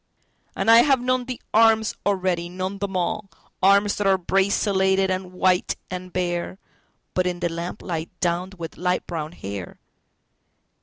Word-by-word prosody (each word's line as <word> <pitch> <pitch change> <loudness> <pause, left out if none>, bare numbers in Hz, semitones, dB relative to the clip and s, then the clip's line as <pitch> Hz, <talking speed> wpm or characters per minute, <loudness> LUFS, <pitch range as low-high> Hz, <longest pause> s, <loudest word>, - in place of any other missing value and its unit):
And 225 - +3
I 230 - +9
have 270 +1 +4
known 255 0 0
the 250 -1 -5
arms 220 -1 +4
already, 185 -3 0
known 185 +2 -4
them 200 -2 -2
all—Arms 200 +2 +1
that 205 - 0
are 190 -1 +4
braceleted 190 0 +2
and 185 -1 -3
white 185 0 +1 0.2
and 185 0 -6
bare(But 180 +1 -4
in 175 -1 -2
the 175 -1 0
lamplight, 170 -1 -4
downed 180 +2 -1
with 165 -4 -8
light 180 +1 0
brown 160 -3 -4
hair!) 100 - -7
185 Hz, 140 wpm, -23 LUFS, 175-200 Hz, 0.2 s, I